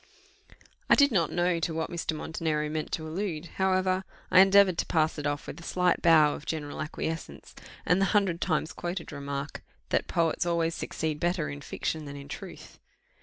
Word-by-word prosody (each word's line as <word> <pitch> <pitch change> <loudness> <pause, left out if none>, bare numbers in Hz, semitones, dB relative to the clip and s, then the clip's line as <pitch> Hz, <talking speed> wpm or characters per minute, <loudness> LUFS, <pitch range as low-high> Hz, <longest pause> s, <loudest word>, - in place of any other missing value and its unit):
I - - +8
did 280 -1 +5
not 170 -8 +2
know 175 -1 +1
to 165 -1 -2
what 160 0 -2
Mr. 170 -2 -2
Montenero 155 -1 -2
meant 155 0 -3
to 160 -1 -2
allude: 165 -1 -3
however, 185 0 +2 0.3
I 185 - +7
endeavoured 195 -2 +6
to - - +1
pass 160 -1 +1
it 150 - -2
off 145 0 -2
with 155 - -8
a - - -11
slight 180 +1 +1
bow 155 -3 +6
of - - -9
general 150 -3 -4
acquiescence, 160 +1 -5 0.3
and 180 +2 +3
the - - +4
hundred 195 -4 +1
times 160 0 0
quoted 175 -1 -5
remark, 140 0 -5 0.3
that - - +1
poets 165 -1 +1
always 170 -1 0
succeed 155 -2 -3
better 175 -2 0
in 145 0 -7
fiction 155 +2 -3
than 140 0 -7
in 140 0 -10
truth. - - -9
165 Hz, 185 wpm, -28 LUFS, 155-180 Hz, 0.3 s, I